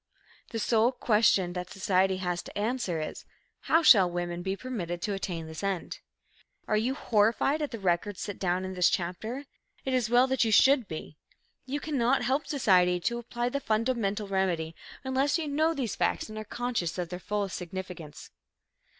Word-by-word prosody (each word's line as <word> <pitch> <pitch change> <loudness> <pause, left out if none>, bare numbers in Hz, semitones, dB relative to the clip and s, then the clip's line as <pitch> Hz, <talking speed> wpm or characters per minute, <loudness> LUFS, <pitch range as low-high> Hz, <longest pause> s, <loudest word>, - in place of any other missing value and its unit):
The 230 - -4
sole 225 +2 +3
question 210 -7 +2
that 180 0 -5
society 190 -1 +1
has 180 -1 -2
to - - -10
answer 210 -6 -1
is, 155 - -5 0.4
how 330 +1 +2
shall 195 - +7
women 175 0 -3
be 190 +2 -2
permitted 185 -10 -4
to 205 - -1
attain 175 -4 -4
this 160 0 -8
end? 195 -3 -3 0.7
Are 215 - +1
you 240 +5 +1
horrified 235 +5 +2
at 295 - -1
the 230 - -6
record 190 0 0
set 205 - -5
down 185 0 0
in 190 - -5
this 180 -1 +4
chapter? 200 +9 -3 0.4
It 265 - -1
is 245 -3 +1
well 245 +2 +5
that 265 -1 +1
you 225 - +1
should 260 +1 +5
be. 155 -2 -7 0.5
You 280 +3 -2
cannot 270 -4 +1
help 265 +5 0
society 180 -10 +3
to 235 +6 -1
apply 240 +1 -3
the 280 - -2
fundamental 220 -4 0
remedy 180 -5 0 0.3
unless 265 +3 +1
you 320 -2 -3
know 310 +3 +2
these 250 -7 -2
facts - - 0
and 215 - -8
are 215 - -6
conscious 235 -9 -2
of 175 -2 -3
their 180 0 -5
fullest 200 0 -2
significance. 180 -4 -7
210 Hz, 180 wpm, -29 LUFS, 180-245 Hz, 0.7 s, shall